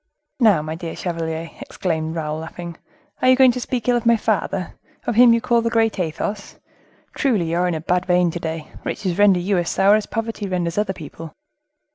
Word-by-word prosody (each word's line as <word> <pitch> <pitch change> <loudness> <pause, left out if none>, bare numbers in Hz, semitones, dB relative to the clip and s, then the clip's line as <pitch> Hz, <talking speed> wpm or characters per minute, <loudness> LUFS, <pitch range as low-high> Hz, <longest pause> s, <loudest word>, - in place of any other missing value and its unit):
"Now, 210 - +4
my 155 0 -4
dear 165 0 -6
chevalier," 165 -2 -4
exclaimed 160 -2 -3
Raoul, 155 -1 -3
laughing, 170 +1 -8 0.5
"are 255 - +4
you 255 - +7
going 260 -1 +6
to 250 - -4
speak 245 -1 -3
ill 245 - +4
of 240 - 0
my 235 0 +5
father, - - -1 0.3
of - - 0
him 240 +2 +7
you 230 - +4
call 235 0 +2
the 230 - 0
great 225 -2 +1
Athos? 195 +4 -3 0.6
Truly 210 - 0
you 170 - 0
are 180 +1 +2
in 175 - -1
a 155 - -4
bad 180 +2 0
vein 180 -1 +3
to 175 - -5
day; 160 -1 -5
riches 190 -2 -3
render 200 -3 +5
you 185 +1 +1
as 175 - -2
sour 195 +1 +4
as 215 0 +1
poverty 225 -2 -4
renders 180 -1 -1
other 210 -2 0
people." 160 -1 -10
180 Hz, 210 wpm, -21 LUFS, 165-225 Hz, 0.6 s, you